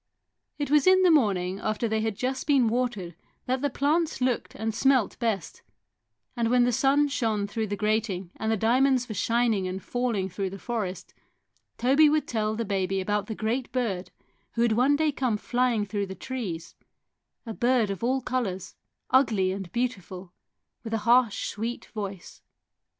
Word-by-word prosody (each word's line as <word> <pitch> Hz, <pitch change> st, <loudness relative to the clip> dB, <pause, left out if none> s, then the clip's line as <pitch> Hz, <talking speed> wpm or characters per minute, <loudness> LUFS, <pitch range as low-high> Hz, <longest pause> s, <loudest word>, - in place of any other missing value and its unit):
It 290 Hz, -2 st, -3 dB
was 300 Hz, 0 st, +4 dB
in 375 Hz, 0 st, +6 dB
the 360 Hz, -, +6 dB
morning 195 Hz, -, +2 dB
after 215 Hz, +2 st, -1 dB
they 220 Hz, 0 st, 0 dB
had 220 Hz, -2 st, -1 dB
just 260 Hz, +7 st, -3 dB
been 275 Hz, -5 st, +4 dB
watered 235 Hz, -7 st, -2 dB, 0.3 s
that 255 Hz, +1 st, -1 dB
the 285 Hz, -, +1 dB
plants 310 Hz, +4 st, 0 dB
looked 250 Hz, -2 st, -1 dB
and 220 Hz, +1 st, -2 dB
smelt 260 Hz, -1 st, +2 dB
best, 225 Hz, -6 st, -2 dB, 0.7 s
and 235 Hz, -2 st, 0 dB
when 245 Hz, 0 st, +4 dB
the 245 Hz, -, +2 dB
sun 275 Hz, +4 st, +3 dB
shone 225 Hz, -7 st, -1 dB
through 220 Hz, +2 st, -3 dB
the 205 Hz, -, -2 dB
grating 210 Hz, -4 st, -1 dB
and 220 Hz, 0 st, -1 dB
the 220 Hz, -, +1 dB
diamonds 250 Hz, +3 st, +2 dB
were 220 Hz, -, -5 dB
shining 225 Hz, -2 st, +1 dB
and 185 Hz, +1 st, -4 dB
falling 240 Hz, -6 st, -1 dB
through 190 Hz, +1 st, -3 dB
the 195 Hz, -, -8 dB
forest, 200 Hz, -4 st, -4 dB, 0.6 s
Toby 275 Hz, +5 st, +5 dB
would 305 Hz, 0 st, +1 dB
tell 215 Hz, -2 st, -1 dB
the 230 Hz, +1 st, -2 dB
baby 195 Hz, -1 st, -1 dB
about 205 Hz, +1 st, -1 dB
the 220 Hz, -, -4 dB
great 235 Hz, +4 st, -2 dB
bird 195 Hz, -8 st, -2 dB, 0.4 s
who 235 Hz, -, +1 dB
would 235 Hz, -, +3 dB
one 250 Hz, +6 st, +3 dB
day 310 Hz, 0 st, +1 dB
come 255 Hz, -6 st, -1 dB
flying 240 Hz, -1 st, 0 dB
through 200 Hz, -1 st, -3 dB
the 190 Hz, -, -7 dB
trees 185 Hz, -8 st, -5 dB, 0.7 s
a 225 Hz, -, -5 dB
bird 240 Hz, -3 st, +2 dB
of 195 Hz, -, -6 dB
all 260 Hz, +2 st, +1 dB
colours, 200 Hz, -8 st, -3 dB, 0.4 s
ugly 215 Hz, -8 st, +3 dB
and 190 Hz, -2 st, -6 dB
beautiful, 190 Hz, -7 st, -4 dB, 0.5 s
with 225 Hz, -1 st, -3 dB
a 210 Hz, -1 st, -4 dB
harsh 240 Hz, -2 st, +3 dB
sweet 230 Hz, +3 st, -4 dB
voice. 200 Hz, -4 st, -7 dB
225 Hz, 175 wpm, -27 LUFS, 200-255 Hz, 0.7 s, in